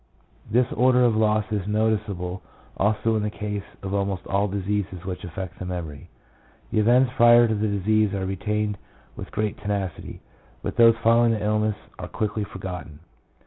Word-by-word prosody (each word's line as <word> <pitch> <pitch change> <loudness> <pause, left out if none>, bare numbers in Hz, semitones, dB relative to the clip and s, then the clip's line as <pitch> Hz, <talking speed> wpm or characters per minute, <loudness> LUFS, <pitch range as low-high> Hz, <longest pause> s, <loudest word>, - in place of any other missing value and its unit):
This 120 +3 +3
order 125 +1 +4
of 115 -2 +3
loss 110 -1 +2
is 100 -3 -2
noticeable 105 -4 -1 0.3
also 110 +2 +1
in 110 - +1
the 105 - -1
case 105 -1 -4 0.2
of 95 0 -4
almost 100 -2 -1
all 100 +1 +1
diseases 100 -2 -3
which 90 -1 -5
affect 90 +1 -7
the 90 - -5
memory. 85 -6 -6 0.6
The - - +1
events 125 +4 +4
prior 120 -1 +7
to 110 - 0
the 110 0 0
disease 105 +1 +1
are 95 -1 -2
retained 105 +1 -2 0.4
with - - -8
great 105 -1 -2
tenacity, 100 -3 -4 0.4
but - - -3
those 115 -1 +6
following 115 0 +4
the 105 - -3
illness 105 0 +1 0.2
are - - -5
quickly 105 0 -2
forgotten. 90 -6 -8
105 Hz, 165 wpm, -24 LUFS, 95-110 Hz, 0.6 s, prior